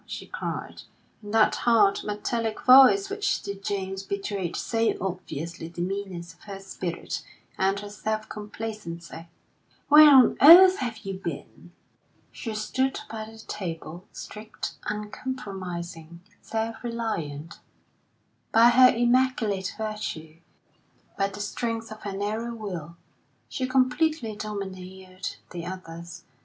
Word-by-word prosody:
she -, -, -6 dB
cried, -, -, -5 dB, 0.4 s
in 205 Hz, -, -10 dB
that 220 Hz, 0 st, +4 dB
hard, 215 Hz, -4 st, +4 dB
metallic 220 Hz, +2 st, -2 dB
voice 270 Hz, +10 st, +7 dB
which 405 Hz, +1 st, -1 dB
to 200 Hz, -, -4 dB
James 195 Hz, -1 st, -4 dB
betrayed 195 Hz, -2 st, -3 dB
so 225 Hz, -1 st, 0 dB
obviously 170 Hz, -3 st, -5 dB
the 170 Hz, +1 st, -11 dB
meanness 180 Hz, -2 st, -4 dB
of 165 Hz, -, -28 dB
her 200 Hz, -2 st, -7 dB
spirit 185 Hz, -3 st, -5 dB, 0.3 s
and 195 Hz, +1 st, +1 dB
her 205 Hz, -, -8 dB
self 215 Hz, +1 st, -3 dB
complacency. 210 Hz, -6 st, -7 dB, 0.6 s
"Where 300 Hz, +1 st, +10 dB
on 265 Hz, -4 st, +7 dB
earth 365 Hz, +6 st, +10 dB
have 230 Hz, -4 st, -4 dB
you 195 Hz, -1 st, -4 dB
been?" 170 Hz, 0 st, -7 dB, 0.6 s
She 225 Hz, -3 st, -6 dB
stood 260 Hz, +5 st, -1 dB
by 220 Hz, -1 st, -5 dB
the 225 Hz, +1 st, -13 dB
table, 175 Hz, -5 st, -6 dB
straight, 215 Hz, +1 st, -7 dB, 0.2 s
uncompromising, 190 Hz, -7 st, -6 dB, 0.2 s
self 225 Hz, +1 st, -4 dB
reliant; 170 Hz, -11 st, -4 dB, 0.9 s
by 230 Hz, +2 st, +7 dB
her 255 Hz, +1 st, +7 dB
immaculate 240 Hz, -6 st, +1 dB
virtue, 210 Hz, -8 st, -5 dB, 0.8 s
by 195 Hz, -, +1 dB
the 200 Hz, +1 st, -7 dB
strength 225 Hz, +1 st, -3 dB
of 215 Hz, -, -9 dB
her 195 Hz, -2 st, -5 dB
narrow 220 Hz, +4 st, -3 dB
will, 175 Hz, -7 st, -6 dB, 0.5 s
she 255 Hz, -, -3 dB
completely 255 Hz, -1 st, +1 dB
domineered 190 Hz, -3 st, -6 dB, 0.2 s
the 175 Hz, -1 st, -6 dB
others. 170 Hz, -2 st, -8 dB
210 Hz, 120 wpm, -26 LUFS, 185-230 Hz, 0.9 s, Where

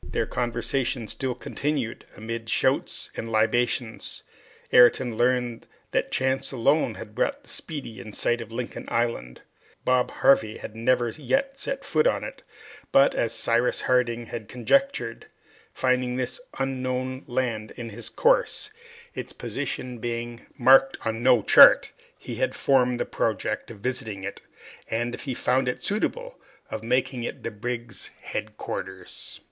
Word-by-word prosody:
The -, -, 0 dB
conversation 120 Hz, 0 st, -1 dB
still 130 Hz, 0 st, -2 dB
continued 135 Hz, -1 st, -3 dB
amid 115 Hz, +1 st, -5 dB
shouts -, -, +1 dB
and 115 Hz, -, -5 dB
libations. 115 Hz, +1 st, 0 dB, 0.5 s
Ayrton 125 Hz, -1 st, +6 dB
learned 120 Hz, 0 st, +1 dB, 0.2 s
that -, -, 0 dB
chance 130 Hz, +1 st, 0 dB
alone 135 Hz, -1 st, +2 dB
had 105 Hz, -, -9 dB
brought 280 Hz, -, -1 dB
the -, -, -12 dB
"Speedy" 140 Hz, -9 st, -6 dB
in 110 Hz, -, -8 dB
sight 120 Hz, +3 st, +1 dB
of 115 Hz, -1 st, -9 dB
Lincoln 120 Hz, +1 st, -5 dB
Island; 115 Hz, -, -1 dB, 0.4 s
Bob 125 Hz, -1 st, +3 dB
Harvey 110 Hz, -5 st, +3 dB
had 105 Hz, -, -8 dB
never 120 Hz, +1 st, +2 dB
yet 270 Hz, -, -1 dB
set -, -, -3 dB
foot 460 Hz, -, +3 dB
on -, -, +1 dB
it; -, -, -7 dB, 0.5 s
but, 135 Hz, -, +6 dB
as 115 Hz, -, 0 dB
Cyrus 120 Hz, +1 st, +1 dB
Harding 120 Hz, -2 st, +1 dB
had 115 Hz, -2 st, -6 dB
conjectured, 125 Hz, -, 0 dB, 0.4 s
finding 125 Hz, -1 st, +1 dB
this 130 Hz, -, -2 dB, 0.2 s
unknown 130 Hz, 0 st, -2 dB
land 120 Hz, -4 st, -1 dB
in 120 Hz, -2 st, -5 dB
his 115 Hz, +2 st, -5 dB
course, -, -, +2 dB, 0.4 s
its -, -, -6 dB
position 125 Hz, -2 st, -4 dB
being 120 Hz, +1 st, -4 dB
marked 135 Hz, +2 st, +6 dB
on 115 Hz, 0 st, -1 dB
no 125 Hz, -3 st, +5 dB
chart, -, -, +8 dB, 0.3 s
he -, -, -7 dB
had -, -, 0 dB
formed 125 Hz, -3 st, +3 dB
the -, -, 0 dB
project -, -, -2 dB
of 110 Hz, -4 st, -11 dB
visiting 110 Hz, -5 st, -3 dB
it, 100 Hz, -, -6 dB, 0.5 s
and, 120 Hz, +1 st, -1 dB
if -, -, -7 dB
he 130 Hz, -3 st, -2 dB
found 125 Hz, +1 st, +1 dB
it 125 Hz, -, -4 dB
suitable, -, -, -2 dB, 0.3 s
of 110 Hz, -, -3 dB
making 125 Hz, +2 st, 0 dB
it 120 Hz, -, -5 dB
the 115 Hz, -, -3 dB
brig's 115 Hz, 0 st, -4 dB, 0.2 s
headquarters. 95 Hz, 0 st, -6 dB
125 Hz, 145 wpm, -26 LUFS, 115-130 Hz, 0.5 s, chart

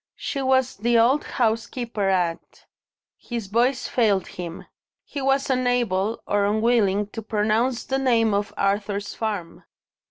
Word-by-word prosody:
She 275 Hz, -, -4 dB
was 260 Hz, -1 st, +2 dB
the 235 Hz, +3 st, +2 dB
old 250 Hz, +6 st, +4 dB
housekeeper 230 Hz, -3 st, -1 dB
at 175 Hz, -3 st, -2 dB, 0.3 s
" -, -, -71 dB
His 235 Hz, -3 st, -3 dB
voice 240 Hz, +6 st, +1 dB
failed 210 Hz, -6 st, +2 dB
him. 175 Hz, -1 st, -7 dB, 0.4 s
He 280 Hz, -, -6 dB
was 270 Hz, +1 st, +1 dB
unable, 240 Hz, -5 st, 0 dB
or 205 Hz, 0 st, +1 dB
unwilling, 210 Hz, -1 st, +2 dB
to 225 Hz, -, -6 dB
pronounce 220 Hz, +3 st, 0 dB
the 270 Hz, 0 st, -1 dB
name 230 Hz, -5 st, +2 dB
of 205 Hz, +1 st, -1 dB
Arthur's 200 Hz, 0 st, -1 dB
farm. 205 Hz, -7 st, -4 dB
225 Hz, 135 wpm, -24 LUFS, 200-245 Hz, 0.4 s, old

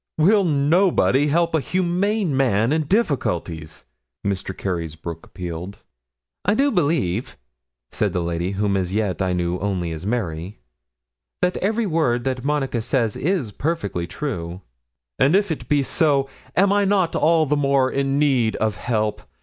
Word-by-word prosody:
'Will 195 Hz, +6 st, +4 dB
nobody 150 Hz, -2 st, +3 dB
help 170 Hz, +3 st, +1 dB
a 160 Hz, -, +3 dB
humane 185 Hz, +1 st, 0 dB
man 120 Hz, -1 st, +2 dB
in 155 Hz, -1 st, +1 dB
difficulties?' 90 Hz, -, -1 dB, 0.4 s
Mr. 95 Hz, -1 st, -2 dB
Carysbroke 85 Hz, -2 st, -4 dB
appealed. 90 Hz, +2 st, -7 dB, 0.6 s
'I 205 Hz, -, +2 dB
do 280 Hz, +4 st, +3 dB
believe,' 140 Hz, -, 0 dB, 0.5 s
said -, -, 0 dB
the -, -, -1 dB
lady 85 Hz, +3 st, -2 dB
whom 100 Hz, 0 st, 0 dB
as 95 Hz, -2 st, -1 dB
yet 100 Hz, -2 st, -1 dB
I 90 Hz, -1 st, +1 dB
knew 90 Hz, 0 st, -1 dB
only 95 Hz, -4 st, -2 dB
as 80 Hz, 0 st, -6 dB
Mary, 95 Hz, -5 st, -3 dB, 0.9 s
'that 180 Hz, 0 st, +2 dB
every 220 Hz, +4 st, 0 dB
word 155 Hz, -10 st, +1 dB
that 130 Hz, -2 st, -2 dB
Monica 135 Hz, -4 st, 0 dB
says 115 Hz, -2 st, 0 dB
is 155 Hz, -, -1 dB
perfectly 100 Hz, -, -2 dB
true.' 90 Hz, -, -5 dB, 0.6 s
'And 140 Hz, +7 st, +4 dB
if 200 Hz, -2 st, +2 dB
it 160 Hz, -, -5 dB
be 145 Hz, -1 st, +3 dB
so, 140 Hz, -1 st, +2 dB, 0.3 s
am 200 Hz, +2 st, +4 dB
I 205 Hz, 0 st, +3 dB
not 195 Hz, -4 st, +2 dB
all 160 Hz, 0 st, +3 dB
the 150 Hz, +1 st, +1 dB
more 140 Hz, -2 st, +2 dB
in 135 Hz, 0 st, 0 dB
need 130 Hz, -7 st, +2 dB
of 110 Hz, -3 st, -1 dB
help? 110 Hz, -3 st, -1 dB
135 Hz, 150 wpm, -22 LUFS, -, 0.9 s, Will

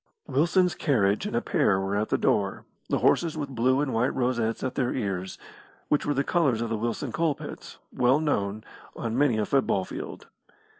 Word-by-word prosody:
Wilson's 175 Hz, +5 st, +2 dB
carriage 110 Hz, -, +1 dB
and 210 Hz, -, -2 dB
pair 140 Hz, -, +2 dB
were 95 Hz, +1 st, -2 dB
at 105 Hz, +1 st, 0 dB
the -, -, +2 dB
door, 100 Hz, -2 st, 0 dB, 0.2 s
the -, -, +2 dB
horses 165 Hz, -2 st, +2 dB
with 145 Hz, -2 st, -3 dB
blue 130 Hz, +2 st, +2 dB
and 145 Hz, -3 st, -1 dB
white 115 Hz, +3 st, +1 dB
rosettes 120 Hz, -3 st, 0 dB
at 130 Hz, -1 st, -2 dB
their 125 Hz, -2 st, 0 dB
ears, 95 Hz, -5 st, -3 dB, 0.5 s
which 150 Hz, -, +1 dB
were 145 Hz, -, +2 dB
the 140 Hz, -, +1 dB
colours 140 Hz, -8 st, +1 dB
of 115 Hz, 0 st, -2 dB
the 115 Hz, -, -1 dB
Wilson 115 Hz, +1 st, -3 dB
Coal 165 Hz, -3 st, +1 dB
pits, -, -, -9 dB, 0.2 s
well 125 Hz, +4 st, +3 dB
known, 110 Hz, -9 st, -1 dB, 0.3 s
on 115 Hz, -1 st, -3 dB
many 135 Hz, -4 st, +3 dB
a 105 Hz, -, +1 dB
football 105 Hz, -7 st, +1 dB
field. -, -, -7 dB
125 Hz, 190 wpm, -26 LUFS, 110-145 Hz, 0.5 s, well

